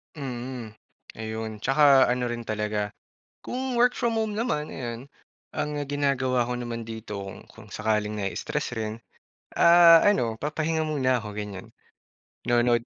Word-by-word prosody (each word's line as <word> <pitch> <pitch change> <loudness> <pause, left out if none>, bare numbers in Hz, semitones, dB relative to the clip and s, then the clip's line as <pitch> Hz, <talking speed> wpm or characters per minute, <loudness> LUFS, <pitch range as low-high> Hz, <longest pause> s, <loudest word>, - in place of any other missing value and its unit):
Mm, 125 -4 -6 0.5
ayun. 110 0 -4
Tsaka 135 +1 +5
ano 125 0 0
rin 120 0 -4
talaga, 105 -1 -1 0.5
kung 255 -1 -3
work 245 +1 +4
from 230 -2 0
home 215 -2 -1
naman, 185 -10 -1
eh, - - -8
yun, 115 -1 -4 0.6
ang 150 - -1 0.2
ginagawa 135 -3 +1
ko 125 +1 -3
naman 115 -1 -4
dito, 110 -1 -7
kung 95 - -10
kung 110 -2 -15
sakaling 105 -1 -1
nai-stress 125 +7 -3
rin, 110 0 -4 0.6
ah, 170 -1 +8
ano, 125 - +2
papahinga 155 +5 -1
muna 130 -6 0
ako 105 - -6
ganiyan. 105 -2 -7 0.7
Nanonood 120 -1 +2
125 Hz, 140 wpm, -26 LUFS, 110-150 Hz, 0.7 s, ah